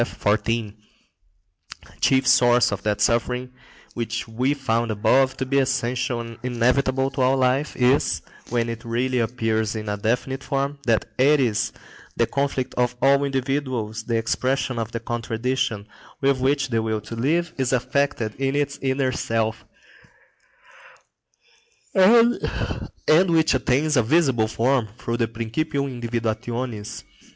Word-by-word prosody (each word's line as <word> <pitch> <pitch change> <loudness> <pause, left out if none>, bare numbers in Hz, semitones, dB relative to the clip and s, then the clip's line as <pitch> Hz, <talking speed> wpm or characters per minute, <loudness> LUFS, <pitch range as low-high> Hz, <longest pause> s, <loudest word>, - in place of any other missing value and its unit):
A - - +3 1.9
chief 130 0 +3
source 120 -3 +4
of 100 -1 -3
that 105 0 -1
suffering 125 +2 0 0.4
which 115 0 -3
we 125 +6 0
found 120 -4 -1
above 130 +5 +2
to 130 - -2
be 140 +1 +2
essential 125 -2 0
and 115 -1 -9
inevitable 130 +2 +1
to 135 -1 -3
all 130 +1 +3
life 130 +3 +1
is, 125 +2 +2 0.3
when 120 -1 0
it 115 0 -5
really 125 +2 -1
appears 110 -2 -1
in 110 -1 -5
a 105 0 -2
definite 125 +6 -1
form, 140 0 -2
that 115 -2 +2
Eris, 130 -5 +3 0.5
the - - +3
conflict 135 -2 -2
of 125 0 +1
all 140 +1 +4
individuals, 130 -5 -2
the 115 -1 0
expression 130 +2 -1
of 115 -1 -3
the 115 - -3
contradiction, 115 -1 -2 0.3
with 135 -1 +2
which 135 0 +1
the 115 -2 +1
will 110 -1 -2
to 115 +3 -8
live 165 +8 0
is 130 -2 +1
affected 125 -3 0
in 135 0 0
its 145 -1 -1
inner 130 -1 0
self, 115 -1 -2 2.3
and 230 +5 +5 0.9
which 160 -1 +3
attains 135 +4 +1
a 125 - +5
visible 125 -3 +2
form 120 +1 +1
through 115 -1 -3
the 115 -1 +1
principium 130 +3 -3
individuationis. 115 -1 -3
125 Hz, 135 wpm, -23 LUFS, 115-135 Hz, 2.3 s, and